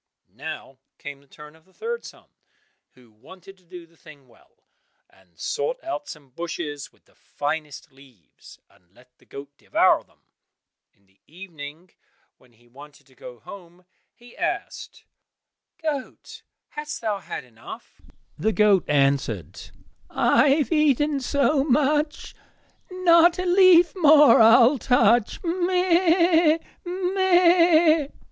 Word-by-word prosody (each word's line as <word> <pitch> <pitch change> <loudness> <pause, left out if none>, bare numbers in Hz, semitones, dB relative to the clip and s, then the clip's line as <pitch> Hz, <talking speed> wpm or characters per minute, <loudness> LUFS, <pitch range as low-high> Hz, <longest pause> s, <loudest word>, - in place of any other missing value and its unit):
Now 135 -1 -9 0.2
came 145 -1 -10
the 140 - -27
turn 150 +2 -15
of 160 - -24
the 190 +1 -31
third 470 +1 -5
son, - - -14 0.7
who 125 -3 -22
wanted 185 - -16
to - - -30
do 175 0 -13
the 165 0 -29
thing 150 -5 -18
well, 120 - -27 0.4
and - - -29
sought 485 +1 -3
out 300 -3 -6
some 145 -4 -12
bushes 145 -2 -7
with - - -33
the - - -30
finest 145 -1 -6
leaves, 130 - -20
and 90 +2 -31
let 125 0 -24
the - - -27
goat 140 0 -11
devour - - +1
them. - - -34 0.7
In 100 - -38
the 95 0 -36
evening 165 -1 -12 0.5
when 125 -2 -26
he 120 +1 -28
wanted 145 +4 -16
to 130 - -26
go 125 -3 -13
home, 180 - -14 0.3
he 240 0 -19
asked, - - -6 0.7
"Goat, 305 -5 -7 0.3
hast 300 0 -7
thou 215 -3 -3
had - - -8
enough?" 120 -3 -14 0.4
The 220 +7 0
goat 205 -4 +3
answered, 135 - -1 0.4
"I - - +2
have 290 +3 0
eaten 295 -2 +1
so 280 +2 0
much, 295 +2 -1 0.6
Not 345 -2 +3
a 365 - -3
leaf 360 -1 +5
more 300 -8 +5
I'll 235 +4 +5
touch, 235 -2 +1
meh! 345 -2 +2
200 Hz, 130 wpm, -23 LUFS, -, 0.7 s, leaf